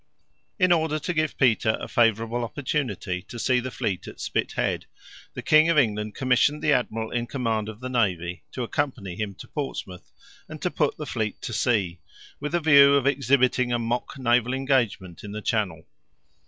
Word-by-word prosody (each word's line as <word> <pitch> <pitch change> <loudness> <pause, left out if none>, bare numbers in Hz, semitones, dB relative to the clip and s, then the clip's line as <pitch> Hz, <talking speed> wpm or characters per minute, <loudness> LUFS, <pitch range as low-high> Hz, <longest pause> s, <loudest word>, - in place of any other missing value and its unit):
In 185 -3 +3
order 160 -2 +2
to 175 +4 -3
give 155 -2 -1
Peter 110 -4 +3
a - - -6
favorable 115 0 +1
opportunity 115 -7 -3
to 105 +5 -10
see 125 +1 +2
the 130 +1 -4
fleet 95 -7 -3
at - - -10
Spithead, - - -2 0.5
the - - -6
King 155 +1 +5
of 165 - +2
England 105 -5 +1
commissioned 135 +3 +2
the 150 - +4
admiral 115 -3 -1
in 120 -1 -2
command 115 -5 -2
of 110 +2 -10
the 130 - -4
navy 90 -8 -1
to 125 - -3
accompany 120 - -3
him 100 -1 -4
to - - -11
Portsmouth, 115 -10 -6 0.4
and - - -8
to - - 0
put - - 0
the - - -5
fleet 110 -2 -3
to 120 - -4
sea, 100 -8 0 0.4
with 150 +3 -4
the 175 - +3
view 140 -3 +7
of 140 -2 +2
exhibiting 130 -2 +2
a 120 - +2
mock 120 +3 -3
naval 125 0 +2
engagement 120 - -1
in 105 0 -7
the 105 - -4
Channel. 95 -8 -1
120 Hz, 180 wpm, -25 LUFS, 105-140 Hz, 0.5 s, view